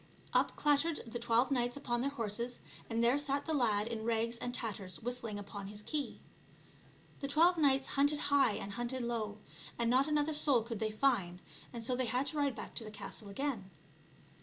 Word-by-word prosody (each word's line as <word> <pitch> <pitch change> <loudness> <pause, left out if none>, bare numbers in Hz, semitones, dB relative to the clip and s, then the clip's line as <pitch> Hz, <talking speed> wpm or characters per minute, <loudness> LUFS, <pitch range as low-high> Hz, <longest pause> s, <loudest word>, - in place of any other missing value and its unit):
Up - - +3
clattered 295 +2 +2
the 235 +1 -5
twelve 235 +3 +2
knights 245 -1 +1
on 240 -1 +1
their 275 - +1
horses, 235 -1 -3 0.3
and 230 0 +1
there 245 +4 +4
sat 285 0 0
the 320 - -1
lad 215 -7 +2
in 225 -1 -4
rags 230 +1 0
and 245 - -3
tatters 200 -7 -4
whistling 235 -3 -3
upon 200 -1 -6
his 205 +1 -8
key. 295 +2 -3 1.0
The 275 - -3
twelve 330 +5 +5
knights 275 -4 +3
hunted 285 +2 +3 0.2
high 270 -6 +5
and 200 - -5
hunted 240 +3 -3
low, 220 -3 -2 0.4
and 235 0 +1
not 265 +3 +4
another 300 0 +1
soul 280 -6 +3
could 230 -2 -5
they 220 - 0
find, 215 -7 +1 0.3
and 235 -2 -6
so 250 +2 +2
they 255 0 0
had 255 +3 +1
to - - -4
ride 285 -4 +1
back - - -7
to 230 - -1
the 215 - -7
castle 210 0 -7
again. 215 -3 -3
240 Hz, 195 wpm, -34 LUFS, 220-275 Hz, 1.0 s, twelve